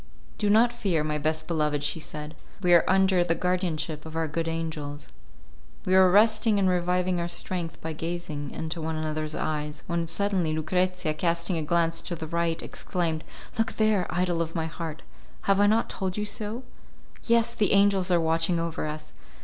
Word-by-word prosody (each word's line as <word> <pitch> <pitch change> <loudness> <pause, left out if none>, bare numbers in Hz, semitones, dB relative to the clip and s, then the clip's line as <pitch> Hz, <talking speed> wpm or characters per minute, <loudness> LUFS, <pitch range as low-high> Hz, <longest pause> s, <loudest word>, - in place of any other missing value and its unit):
"Do 210 - +1
not 230 +3 +5
fear, 195 -10 0
my 150 0 -1
best 155 +1 -1
beloved," 150 -3 0
she 150 +2 -1
said, 150 0 -7 0.3
"we 175 -1 +5
are 170 - +7
under 190 -1 +4
the 170 -1 0
guardianship 165 -4 -1
of 160 0 -9
our 165 0 0
good 165 +2 -2
angels." 155 -3 -4 0.8
We 185 - +1
were 190 -1 +7
resting 215 +2 +4
and 195 -1 +3
reviving 180 0 +1
our 170 - -1
strength 175 -1 -3
by 160 0 -4
gazing 155 -3 -4
into 160 +3 -4
one 160 0 -2
another's 155 0 -3
eyes, 150 -1 -3
when 170 -1 -1
suddenly 185 -3 +1
Lucrezia, 180 +1 0
casting 170 +2 0
a - - -1
glance 165 +1 +1
to 175 - -4
the 160 - -5
right, 165 0 -1
exclaimed, 165 -3 -2 0.4
"Look 225 0 +1
there! 215 -4 +2
idol 175 -1 0
of 165 0 -3
my 165 -1 0
heart, 160 -1 -6 0.4
have 195 0 +2
I 205 - +5
not 220 +2 +3
told 190 0 -3
you 210 - -1
so? 215 +4 -4 0.6
Yes, 235 0 +3
the 215 -3 +1
angels 200 -2 +4
are 175 -1 +4
watching 165 +1 +1
over 165 -2 -2
us! 150 - -7
170 Hz, 180 wpm, -27 LUFS, 160-185 Hz, 0.8 s, are